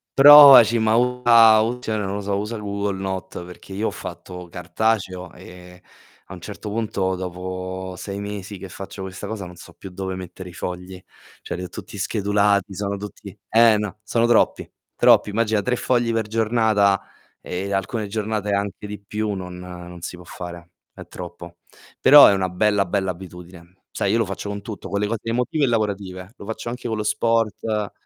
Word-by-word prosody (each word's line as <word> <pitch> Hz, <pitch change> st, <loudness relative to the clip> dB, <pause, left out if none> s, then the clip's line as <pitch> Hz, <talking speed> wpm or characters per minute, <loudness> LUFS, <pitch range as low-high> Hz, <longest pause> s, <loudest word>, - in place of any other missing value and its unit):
provaci, 135 Hz, -5 st, +9 dB
ma 110 Hz, 0 st, +2 dB
usa 120 Hz, -3 st, +5 dB
u 115 Hz, +3 st, -1 dB
cioè 110 Hz, -3 st, -3 dB
non 100 Hz, -1 st, -3 dB
lo 105 Hz, -, -3 dB
so, 100 Hz, 0 st, -2 dB
usa 105 Hz, +3 st, -4 dB
il 105 Hz, -, -7 dB
Google 100 Hz, -1 st, -2 dB
Note 95 Hz, -2 st, -5 dB
perché 90 Hz, +2 st, -12 dB
io 105 Hz, +3 st, -1 dB
ho -, -, -2 dB
fatto 90 Hz, -1 st, -9 dB
cartaceo, 95 Hz, 0 st, -2 dB
ehm, 90 Hz, 0 st, -13 dB, 0.5 s
a -, -, -10 dB
un 90 Hz, -, -10 dB
certo 105 Hz, +3 st, -8 dB
punto, 100 Hz, -3 st, -1 dB
dopo 95 Hz, +1 st, -6 dB
6 100 Hz, +2 st, -6 dB
mesi 100 Hz, 0 st, -6 dB
che 95 Hz, -, -9 dB
faccio 95 Hz, +1 st, -8 dB
questa 95 Hz, +2 st, -7 dB
cosa, 100 Hz, -3 st, -5 dB
non 90 Hz, -, -11 dB
so 85 Hz, 0 st, -14 dB
più 95 Hz, -, -11 dB
dove 95 Hz, 0 st, -5 dB
mettere 95 Hz, 0 st, -9 dB
i 85 Hz, -, -13 dB
fogli. 90 Hz, +1 st, -6 dB, 0.4 s
Cioè -, -, -5 dB
li -, -, -6 dB
ho 90 Hz, -, -7 dB
tutti -, -, -10 dB
schedulati, 100 Hz, -1 st, +1 dB
sono 100 Hz, +1 st, -3 dB
tutti 105 Hz, -1 st, -10 dB
eh 115 Hz, -1 st, +6 dB
no, 105 Hz, -1 st, -5 dB
sono 115 Hz, +2 st, +1 dB
troppi, 120 Hz, -1 st, +2 dB, 0.3 s
troppi. -, -, +5 dB
Immagina 110 Hz, 0 st, 0 dB
3 125 Hz, +4 st, 0 dB
fogli 120 Hz, -1 st, 0 dB
per 115 Hz, -1 st, 0 dB
giornata, 110 Hz, -3 st, +2 dB, 0.4 s
ehm, 95 Hz, +2 st, -5 dB
alcune 100 Hz, +2 st, -2 dB
giornate 105 Hz, 0 st, -3 dB
anche 100 Hz, 0 st, -2 dB
di 105 Hz, 0 st, -7 dB
più, 105 Hz, +1 st, -3 dB
non 90 Hz, -2 st, -7 dB
non 90 Hz, -1 st, -10 dB
si 90 Hz, -, -6 dB
può 90 Hz, 0 st, -14 dB
fare, 85 Hz, 0 st, -9 dB, 0.2 s
è -, -, -12 dB
troppo. 85 Hz, -1 st, -10 dB, 0.4 s
Però 145 Hz, 0 st, +10 dB
è -, -, +6 dB
una 95 Hz, -1 st, -1 dB
bella, 100 Hz, +2 st, +2 dB
bella 95 Hz, 0 st, -1 dB
abitudine. 90 Hz, 0 st, -13 dB
Sai, -, -, -1 dB
io -, -, +2 dB
lo 115 Hz, -, +1 dB
faccio 95 Hz, +2 st, -6 dB
con 100 Hz, 0 st, -6 dB
tutto, 110 Hz, -1 st, -8 dB
con 100 Hz, -, -1 dB
le 105 Hz, -, 0 dB
cose 115 Hz, -1 st, -2 dB
emotive 125 Hz, +6 st, 0 dB
e -, -, -1 dB
lavorative. 100 Hz, -4 st, -2 dB
Lo 100 Hz, -, -11 dB
faccio 110 Hz, -, -6 dB
anche 125 Hz, 0 st, -6 dB
con 110 Hz, -2 st, -2 dB
lo 105 Hz, -, -2 dB
sport 110 Hz, -1 st, 0 dB
100 Hz, 195 wpm, -22 LUFS, 95-110 Hz, 0.5 s, Però